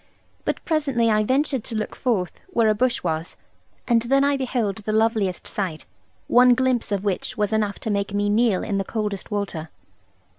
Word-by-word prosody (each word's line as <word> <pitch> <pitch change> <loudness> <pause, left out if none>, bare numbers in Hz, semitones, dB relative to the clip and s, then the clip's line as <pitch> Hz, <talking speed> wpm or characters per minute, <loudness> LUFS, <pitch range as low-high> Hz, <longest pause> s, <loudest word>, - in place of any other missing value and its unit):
But - - -2
presently 275 -8 +1
I 215 0 +3
ventured 265 +1 +1
to 230 - -4
look 215 0 -3
forth 215 -9 0 0.2
where 230 -12 +2
a - - +4
bush 250 +3 0
was; 160 -1 -2 0.5
and 235 -2 +4
then 270 +4 +3
I 285 0 +3
beheld 245 -7 -1
the 215 -1 -4
loveliest 220 -4 +1
sight 180 -7 -4 0.4
one 245 0 +6
glimpse 255 -3 0
of 200 -1 0
which 200 -3 -2
was 210 0 0
enough 210 -2 0
to 220 - -2
make 200 -1 -1
me 205 0 0
kneel 215 -1 +2
in 200 -2 -1
the - - 0
coldest 210 -1 -3
water. 200 -7 -3
215 Hz, 185 wpm, -23 LUFS, 200-245 Hz, 0.5 s, one